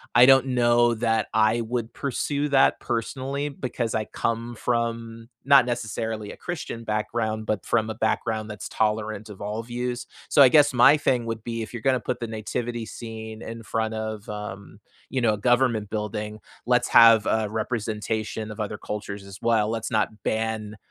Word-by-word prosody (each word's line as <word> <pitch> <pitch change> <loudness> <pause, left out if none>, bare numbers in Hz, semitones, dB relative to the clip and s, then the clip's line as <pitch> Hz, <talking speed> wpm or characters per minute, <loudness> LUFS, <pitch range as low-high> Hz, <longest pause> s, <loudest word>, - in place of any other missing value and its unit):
I 120 0 +9
don't 135 0 +6
know 120 -1 +3
that 115 -1 +1
I 110 +2 +3
would 115 0 -3
pursue 145 +2 -2
that, 135 -1 +4
personally, 135 +5 -3
because 125 -4 -3
I 110 -1 -1
come 115 +1 -3
from, 115 0 -2 0.2
not 140 -3 +6
necessarily 110 -3 -3
a - - -11
Christian 135 -9 -5
background, 110 0 -2
but 105 -1 -1
from 110 -2 0
a - - -6
background 110 0 -1
that's 105 - -6
tolerant 110 0 -1
of 100 - -10
all 105 +2 -3
views. 120 +1 -4 0.2
So, 145 - +5
I 135 - +9
guess, 145 0 +5
my 125 +5 +7
thing 125 -5 +1
would 115 -1 -4
be, 115 -1 -4
if 110 - -7
you're 120 -2 -6
gonna 130 -2 +3
put 125 0 -3
the 115 - -3
nativity 115 +1 -4
scene 110 -1 -8
in 115 +1 -7
front 110 0 -2
of, 110 -1 -5
um, 105 -1 -7 0.3
you 130 - 0
know, 110 -3 +3
a - - -3
government 120 -2 +2
building, 105 0 -4 0.3
let's - - +2
have 115 -2 +7
a 110 -1 +1
representation 110 0 -3
of 105 - -9
other 105 0 -3
cultures 100 -1 -6
as 100 0 -10
well. 110 -2 +2
Let's 115 +1 -3
not 110 -1 -1
ban, 110 -1 -2
115 Hz, 180 wpm, -25 LUFS, 110-120 Hz, 0.3 s, I